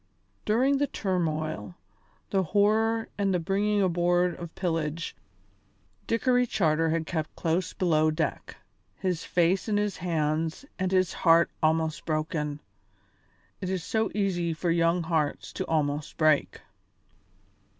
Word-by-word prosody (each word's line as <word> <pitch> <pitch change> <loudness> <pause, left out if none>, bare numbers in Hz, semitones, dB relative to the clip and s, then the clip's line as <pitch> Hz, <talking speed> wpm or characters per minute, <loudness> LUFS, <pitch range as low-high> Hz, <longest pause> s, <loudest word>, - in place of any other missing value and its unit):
During 260 +6 +2
the 285 - +2
turmoil, 155 - -2 0.6
the 195 - +3
horror 215 +5 +2
and 200 -1 +2
the 180 - +1
bringing 200 +4 +1
aboard 175 0 +2
of 170 -2 -8
pillage, 165 -2 -2 0.9
Dickory 245 +2 +2
Charter 165 -5 +1
had 160 0 0
kept 155 -2 -3
close 170 +2 -1
below 155 -4 +2
deck, 155 -1 -3 0.4
his 180 -4 -2
face 180 +4 +1
in 205 - +2
his 205 -2 -1
hands 160 - -1
and 185 0 0
his 185 -2 +2
heart 165 0 +4
almost 160 0 +1
broken. 155 -2 -2 1.0
It 185 - -3
is 185 -3 -2
so 220 +4 0
easy 175 -5 0
for 165 +2 -1
young 170 +1 +2
hearts 160 -3 -1
to - - -4
almost 150 -2 -1
break. 155 -2 +2
170 Hz, 130 wpm, -27 LUFS, 155-195 Hz, 1.0 s, heart